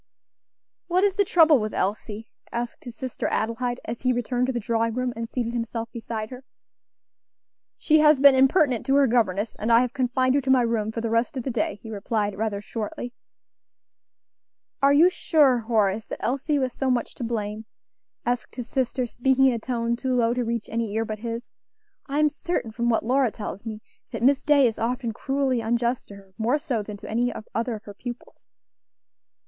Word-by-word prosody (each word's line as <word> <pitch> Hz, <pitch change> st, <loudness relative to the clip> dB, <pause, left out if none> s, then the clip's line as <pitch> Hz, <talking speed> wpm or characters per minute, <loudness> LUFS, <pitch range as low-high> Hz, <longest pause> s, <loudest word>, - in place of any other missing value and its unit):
"What 360 Hz, +2 st, +2 dB
is 405 Hz, -1 st, +3 dB
the 405 Hz, +1 st, +3 dB
trouble 325 Hz, -6 st, +5 dB
with 215 Hz, -1 st, -3 dB
Elsie?" 210 Hz, +2 st, -3 dB, 0.2 s
asked 235 Hz, +2 st, -4 dB
his 240 Hz, -2 st, -8 dB
sister 255 Hz, +1 st, -4 dB
Adelaide, 240 Hz, +2 st, -1 dB
as 230 Hz, +1 st, -5 dB
he 255 Hz, -, +2 dB
returned 245 Hz, +1 st, 0 dB
to -, -, 0 dB
the 240 Hz, -, -2 dB
drawing 230 Hz, 0 st, 0 dB
room 255 Hz, -1 st, -1 dB
and 230 Hz, 0 st, -5 dB
seated 235 Hz, -2 st, -2 dB
himself 230 Hz, -1 st, -3 dB
beside 225 Hz, -1 st, -5 dB
her. 255 Hz, +1 st, -9 dB, 1.3 s
"She 310 Hz, 0 st, +3 dB
has 300 Hz, -2 st, +6 dB
been 280 Hz, 0 st, +8 dB
impertinent 265 Hz, -, +3 dB
to 270 Hz, -, +3 dB
her 280 Hz, 0 st, +6 dB
governess, 220 Hz, -4 st, +1 dB
and 220 Hz, +2 st, -1 dB
I 230 Hz, +1 st, +7 dB
have 250 Hz, -1 st, -1 dB
confined 255 Hz, 0 st, +1 dB
her 285 Hz, -, +2 dB
to 265 Hz, -, -4 dB
my 260 Hz, -2 st, +5 dB
room 225 Hz, -2 st, 0 dB
for 230 Hz, -, -4 dB
the 230 Hz, -1 st, -2 dB
rest 230 Hz, +4 st, +1 dB
of 255 Hz, -, -3 dB
the 265 Hz, -, -2 dB
day," 230 Hz, -3 st, -1 dB
he 225 Hz, -, -8 dB
replied, 205 Hz, 0 st, -2 dB
rather 205 Hz, -1 st, -2 dB
shortly. 230 Hz, +3 st, -5 dB, 1.7 s
"Are 275 Hz, 0 st, +5 dB
you 325 Hz, +6 st, +6 dB
sure, 290 Hz, -8 st, +3 dB
Horace, 220 Hz, -2 st, 0 dB
that -, -, -7 dB
Elsie 280 Hz, +4 st, 0 dB
was 260 Hz, -3 st, -1 dB
so 270 Hz, -, -1 dB
much 245 Hz, -2 st, 0 dB
to -, -, -7 dB
blame?" 220 Hz, -1 st, -3 dB, 0.6 s
asked 245 Hz, 0 st, -2 dB
his 245 Hz, -2 st, -5 dB
sister, 255 Hz, 0 st, -1 dB
speaking 265 Hz, +3 st, +2 dB
in 260 Hz, -, +5 dB
a 230 Hz, -, -2 dB
tone 235 Hz, 0 st, -1 dB
too 255 Hz, +1 st, -1 dB
low 235 Hz, -1 st, +2 dB
to 250 Hz, 0 st, -1 dB
reach 230 Hz, -1 st, -3 dB
any 225 Hz, -2 st, -2 dB
ear 225 Hz, 0 st, 0 dB
but 215 Hz, -1 st, -5 dB
his. 230 Hz, +1 st, -4 dB, 0.6 s
"I 280 Hz, 0 st, -2 dB
am 305 Hz, 0 st, +5 dB
certain, 295 Hz, -6 st, -3 dB
from 235 Hz, +2 st, -1 dB
what 225 Hz, -1 st, +1 dB
Lora 260 Hz, +1 st, +3 dB
tells 210 Hz, 0 st, -7 dB
me, 215 Hz, -1 st, -6 dB, 0.3 s
that -, -, -5 dB
Miss 275 Hz, +2 st, +4 dB
Day 290 Hz, -2 st, +5 dB
is 225 Hz, -3 st, 0 dB
often 240 Hz, +1 st, -1 dB
cruelly 270 Hz, 0 st, 0 dB
unjust 235 Hz, +2 st, 0 dB
to 200 Hz, -, -11 dB
her; 195 Hz, -1 st, -16 dB
more 240 Hz, +6 st, +2 dB
so 275 Hz, -8 st, -2 dB
than 205 Hz, 0 st, -7 dB
to -, -, -11 dB
any 240 Hz, +3 st, 0 dB, 0.2 s
other 230 Hz, +1 st, -1 dB
of 215 Hz, -, -10 dB
her 205 Hz, -, -10 dB
pupils." 245 Hz, +3 st, -9 dB
240 Hz, 200 wpm, -25 LUFS, 225-260 Hz, 1.7 s, been